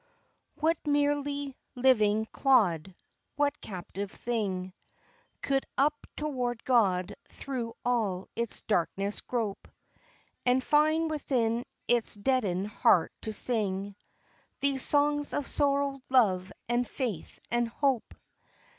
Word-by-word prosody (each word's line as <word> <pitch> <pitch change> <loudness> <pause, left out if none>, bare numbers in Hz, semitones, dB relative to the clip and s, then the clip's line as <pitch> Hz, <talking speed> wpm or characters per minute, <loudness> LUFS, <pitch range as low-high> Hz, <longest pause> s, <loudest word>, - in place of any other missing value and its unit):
What 325 +2 +2
merely 285 -1 0 0.2
living 220 -4 +3
clod, 190 - +2 0.4
what 290 0 0
captive 195 +1 -6
thing, 190 -6 -3 0.7
Could 270 -1 0
up 295 +2 +1
toward 250 -6 -2
God 200 -7 +2 0.2
through 240 -4 -5
all 215 -7 0
its 235 -2 -2
darkness 195 +1 -1
grope, 225 -5 -3 0.8
And 250 +1 +3
find 310 +3 +3
within 245 -6 0 0.2
its 240 -3 +2
deadened 205 -5 0
heart 195 -4 +3
to 220 - -2
sing 200 -3 -1 0.6
These 275 -1 +2
songs 290 +1 +3
of 290 - -1
sorrow, 280 -1 0
love, 195 -8 +3 0.2
and 240 +1 +1
faith, 230 - -4
and 240 0 +2
hope? 260 0 -1
240 Hz, 105 wpm, -29 LUFS, 205-280 Hz, 0.8 s, living